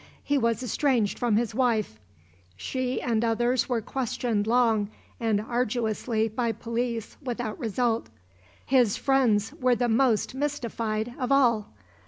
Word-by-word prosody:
He 285 -1 +1
was 230 0 0
estranged 245 -3 +1
from 240 -3 +2
his 230 0 0
wife. 220 - 0 0.6
She 255 - -2
and 230 -2 0
others 240 +2 +1
were 240 -2 0
questioned 230 -3 -2
long 225 -3 +3 0.3
and 225 -3 +1
arduously 225 -1 -1
by 230 +1 -1
police 230 -1 -3
without 240 -3 -4
result. 230 - -1 0.6
His 250 -6 +3
friends 240 -7 +2
were 250 -1 +2
the 240 0 0
most 230 -1 +2
mystified 235 -5 -2
of 255 0 -2
all. 235 -6 +3
235 Hz, 130 wpm, -27 LUFS, 220-250 Hz, 0.6 s, long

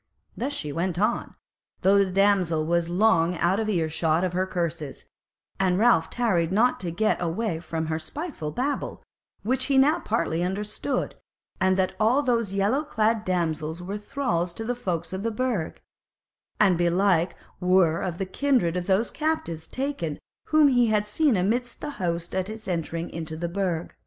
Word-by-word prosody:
Thus 265 +4 -2
she 150 - -4
went 175 +3 -2
on, 215 +5 0 0.5
though 195 +1 +5
the 195 -1 +2
damsel 185 -5 +2
was 170 +1 +1
long 180 -2 +3
out 175 +5 +2
of 220 -1 -1
ear 170 -6 +1
shot 160 +1 +1
of 180 -1 -1
her 185 +1 0
curses; 165 -6 -4 0.5
and 185 -2 +2
Ralph 215 -7 +4
tarried 185 -9 +1
not 235 +6 +3
to 180 - -3
get 215 +5 0
away 175 +1 -1
from 160 -1 -3
her 160 0 -2
spiteful 275 - -5
babble, 265 - -3 0.4
which 255 +4 +1
he 275 -1 +2
now 295 +5 +5
partly 215 - -1
understood; 210 +8 -2 0.5
and 190 0 +3
that 185 -1 +1
all 240 +7 +3
those 230 -6 0
yellow 210 +9 +2
clad 220 -5 +1
damsels 165 -3 -2
were 200 +3 -4
thralls 205 -7 -2
to 225 - -5
the 245 - 0
folk 175 -8 -3
of 190 - -3
the 230 - 0
Burg; 225 -7 -2 0.8
and 190 -5 +4
belike 175 0 +2 0.2
were 180 -3 +3
of 175 -2 -3
the 195 - -2
kindred 220 -4 +1
of 180 -1 -3
those 200 +4 +2
captives 300 - -2
late - - -27
taken 260 - -3 0.3
whom 310 -2 +5
he 245 -3 +4
had 210 -1 +2
seen 265 +1 +2
amidst 235 +6 -1
the 295 - -5
host 170 -1 -2
at 190 +1 -1
its 220 -1 -8
entering 170 -1 -2
into 160 -1 -5
the 170 +1 -2
Burg. 175 -2 -2
190 Hz, 175 wpm, -25 LUFS, 170-230 Hz, 0.8 s, though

